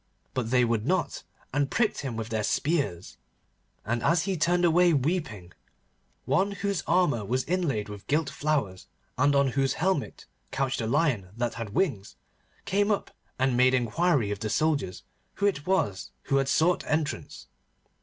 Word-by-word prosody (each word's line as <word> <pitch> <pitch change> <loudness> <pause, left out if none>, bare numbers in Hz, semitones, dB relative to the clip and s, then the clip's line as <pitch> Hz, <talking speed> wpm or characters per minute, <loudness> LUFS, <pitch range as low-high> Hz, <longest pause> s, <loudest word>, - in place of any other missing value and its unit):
But 125 -3 -2
they 125 0 +4
would 115 -2 0
not, 185 0 0 0.3
and 140 -1 +1
pricked 215 +1 +1
him 135 -5 -4
with 115 0 -4
their 110 -1 -1
spears. 120 - -1 0.7
And, 120 +2 -1
as 165 +4 +2
he 195 -1 -1
turned 175 +2 +2
away 175 +1 +4
weeping, 135 - -2 0.7
one 200 +1 +1
whose 200 -2 -2
armour 165 - +2
was 125 +6 -1
inlaid 155 - -1
with 105 -1 -10
gilt 150 +1 +1
flowers, 140 -9 -2 0.3
and 145 +2 +3
on 140 -1 +3
whose 135 +1 +1
helmet 180 -3 -1 0.2
couched 135 -2 -1
a 110 - -2
lion 125 - +1
that 120 -1 -1
had 110 -3 -6
wings, 130 - -1 0.5
came 205 +2 +1
up 205 - -1 0.3
and 130 -1 +1
made 130 +1 +4
inquiry 125 - +1
of 100 - -3
the 110 0 -3
soldiers 145 - 0 0.3
who 200 - -1
it 180 -7 0
was 105 - 0
who 140 - +1
had 135 0 +1
sought 170 +5 +2
entrance. 155 -1 -2
140 Hz, 165 wpm, -27 LUFS, 115-170 Hz, 0.7 s, they